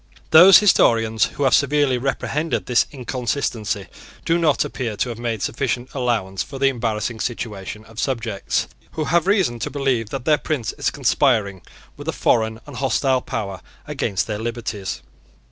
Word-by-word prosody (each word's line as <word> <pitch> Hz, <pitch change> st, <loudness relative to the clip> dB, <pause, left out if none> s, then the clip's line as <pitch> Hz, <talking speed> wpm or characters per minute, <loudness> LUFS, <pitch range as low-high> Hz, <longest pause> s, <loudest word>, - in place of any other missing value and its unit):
Those 175 Hz, +3 st, +10 dB
historians 115 Hz, -, +4 dB
who 145 Hz, -, -4 dB
have 135 Hz, -2 st, +3 dB
severely 140 Hz, -3 st, +3 dB
reprehended 145 Hz, +4 st, -2 dB
this 125 Hz, -1 st, +2 dB
inconsistency 120 Hz, -5 st, -3 dB, 0.4 s
do 165 Hz, +1 st, +2 dB
not 155 Hz, -4 st, +2 dB
appear 115 Hz, -5 st, -4 dB
to 125 Hz, -, -1 dB
have 115 Hz, -1 st, -6 dB
made 115 Hz, -3 st, -3 dB
sufficient 120 Hz, +2 st, -2 dB
allowance 115 Hz, -8 st, -1 dB
for 135 Hz, -, -6 dB
the 135 Hz, 0 st, +3 dB
embarrassing 115 Hz, -2 st, -2 dB
situation 110 Hz, -3 st, -5 dB
of 115 Hz, 0 st, -11 dB
subjects 115 Hz, -7 st, -1 dB, 0.3 s
who 155 Hz, -, -2 dB
have 170 Hz, +4 st, +1 dB
reason 190 Hz, -, +2 dB
to -, -, -3 dB
believe 130 Hz, -6 st, -1 dB
that 135 Hz, 0 st, -5 dB
their 150 Hz, -2 st, +3 dB
prince 140 Hz, -9 st, -2 dB
is -, -, -1 dB
conspiring 100 Hz, -4 st, +1 dB, 0.4 s
with -, -, -10 dB
a -, -, -1 dB
foreign 110 Hz, -1 st, +1 dB
and 145 Hz, -3 st, -10 dB
hostile 130 Hz, 0 st, +1 dB
power 100 Hz, -6 st, -5 dB, 0.2 s
against 95 Hz, -2 st, -2 dB
their 105 Hz, -2 st, -4 dB
liberties. 115 Hz, -4 st, -4 dB
120 Hz, 160 wpm, -21 LUFS, 110-140 Hz, 0.4 s, Those